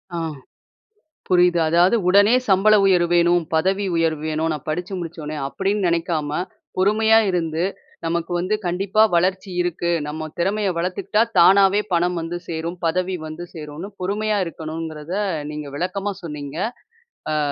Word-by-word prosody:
ஆ, - - -2 1.1
புரியுது. 180 -1 +4
அதாவது, 175 +7 +4
உடனே 205 +5 +5
சம்பள 195 +3 +5
உயர்வு 180 -3 +3
வேணும். 175 0 +3
பதவி 190 +5 +1
உயர்வு 160 -2 0
வேணும். 155 +1 -1
நான் 150 -3 -6
படுச்சு 180 +5 -3
முடுச்ச 170 -1 -7
உடனே. 150 +1 -5
அப்டின்னு 195 +3 -1
நெனைக்காம, 165 -3 -1 0.5
பொறுமையா 220 +3 +4
இருந்து, 165 -2 -1 0.4
நமக்கு 170 +1 -2
வந்து 185 +5 0
கண்டிப்பா 195 +4 +2
வளர்ச்சி 190 +2 0
இருக்கு. 175 0 -1 0.2
நம்ம 155 +1 -5
திறமைய 195 +3 0
வளத்துக்கிட்டா, 185 +5 0 0.2
தானாவே 195 +3 +6
பணம் 175 +1 +1
வந்து 165 +2 -4
சேரும். 170 +2 -4
பதவி 185 +3 0
வந்து 155 +3 -7
சேருன்னு, 155 +5 -7
பொறுமையா 210 +3 0
இருக்கணுங்கிறத, 160 0 -6 0.4
நீங்க 150 -1 -6
விளக்கமா 195 +4 -2
சொன்னீங்க. 150 -2 -6 0.8
அ, - - +1
175 Hz, 135 wpm, -21 LUFS, 165-195 Hz, 1.1 s, தானாவே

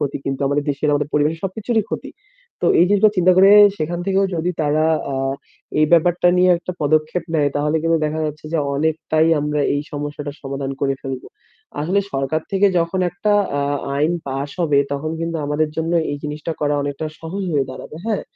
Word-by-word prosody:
ক্ষতি, 145 -2 -1
কিন্তু 135 -1 -2
আমাদের 145 +1 0
দেশের, 145 +1 0
আমাদের 145 0 -1
পরিবেশের 150 +2 +1
সবকিছুরই 220 +4 -1
ক্ষতি। - - -5 0.5
তো - - +1
এই 175 - +7
জিনিসটা 205 +1 +4
চিন্তা 185 0 +5
করে 195 +1 +7 0.3
সেখান 170 +3 -2
থেকেও 195 0 +2
যদি 170 +2 -1
তারা, 150 +1 +2 0.3
আ - - -2 0.6
এই 155 - +5
ব্যাপারটা 175 +1 +4
নিয়ে 180 0 +5
একটা 180 - -6
পদক্ষেপ 155 +3 +1
নেয়, 145 -2 +3
তাহলে 150 +2 +1
কিন্তু 165 0 +2
দেখা 155 +1 -3
যাচ্ছে 150 0 -7
যে 165 - +1 0.2
অনেকটাই 155 +1 +1
আমরা 150 0 -1
এই 145 - 0
সমস্যাটার 145 0 -5
সমাধান 135 0 -4
করে 135 -1 +1
ফেলব। 135 -2 -5 0.6
আসলে 180 +7 +1
সরকার 135 +3 -1
থেকে 195 +1 +4
যখন 170 +3 0
একটা 205 +4 -1 0.3
আ - - 0 0.3
আইন 155 +4 +2
pass 135 +1 -3
হবে 150 -4 +3
তখন 145 +3 -3
কিন্তু 165 0 -2
আমাদের 150 +1 0
জন্য 165 +1 -1 0.2
এই 145 - -2
জিনিসটা 150 +2 -4
করা 145 -1 +1
অনেকটা 145 +2 -3
সহজ 175 +5 -5
হয়ে 140 -3 +2
দাঁড়াবে, 140 - -9
হ্যাঁ? 220 -3 -1
155 Hz, 185 wpm, -20 LUFS, 145-170 Hz, 0.6 s, এই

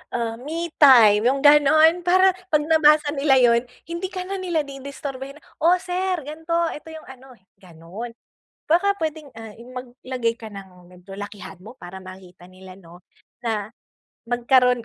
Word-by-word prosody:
ah, 230 -1 -2
me 330 +4 -5
time, 230 -7 +7
yung 275 +2 +1
gano'n. 310 +3 +5
Para 370 +2 +4 0.2
'pag 300 -1 +2
nabasa 305 -1 +4
nila 275 -2 +2
yun 235 -1 +4 0.2
hindi 340 +3 -4
ka 370 -1 -5
na 395 - -4
nila 340 -5 -1
di-disturbohin, 275 0 -8 0.2
"Oh, 340 +3 +4
sir, 370 0 -2
ganito. 320 +3 -5 0.2
Eto 320 +2 -10
yung 315 - -11
ano," 265 -1 -14 0.2
gano'n. 185 +6 -10 0.6
Baka 395 +5 +2
pwedeng, 310 -3 -5
ah, 225 -1 -10
maglagay 250 0 -5
ka 225 - -9
ng 185 -3 -13
medyo 180 +2 -13
lakihan 205 -2 -9
mo 230 +5 -12
para 180 +2 -10
makita 185 -1 -14
nila, 185 0 -14
'no, 175 -2 -16 0.4
na 215 -2 -3 0.6
magkaroon, 245 0 +2
260 Hz, 150 wpm, -22 LUFS, 220-315 Hz, 0.6 s, time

